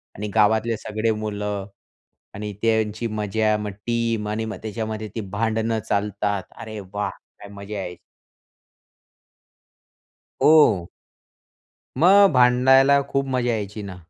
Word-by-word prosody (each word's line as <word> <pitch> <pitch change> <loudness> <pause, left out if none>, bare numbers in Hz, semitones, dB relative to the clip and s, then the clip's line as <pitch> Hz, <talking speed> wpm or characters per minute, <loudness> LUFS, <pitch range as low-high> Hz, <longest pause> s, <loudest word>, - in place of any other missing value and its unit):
आणि 105 +1 -5
गावातले 110 +1 +3
सगळे 110 +1 -2
मुलं 105 -2 -4 0.7
आणि 105 +1 -5
त्यांची 110 0 0
मजा, 110 0 0
मग 105 -1 -4 0.2
टीम 115 -2 -1
आणि 110 +1 -2
मग 110 - -5
त्याच्यामध्ये 110 0 -4
ती 110 - -2
भांडणं 110 +2 -1
चालतात. 100 -1 -1 0.2
अरे 110 -1 -7
वाह! 105 0 -1 0.3
काय 100 - -11
मजा 100 +1 -8
यायची. 90 -2 -6 2.5
हो. 115 - +5 1.1
मग 195 +4 +7
भांडायला 130 +3 +5
खूप 135 0 0
मजा 125 -2 0
यायची 105 -1 -4
ना. 95 -2 -7
110 Hz, 115 wpm, -23 LUFS, 105-115 Hz, 2.5 s, मग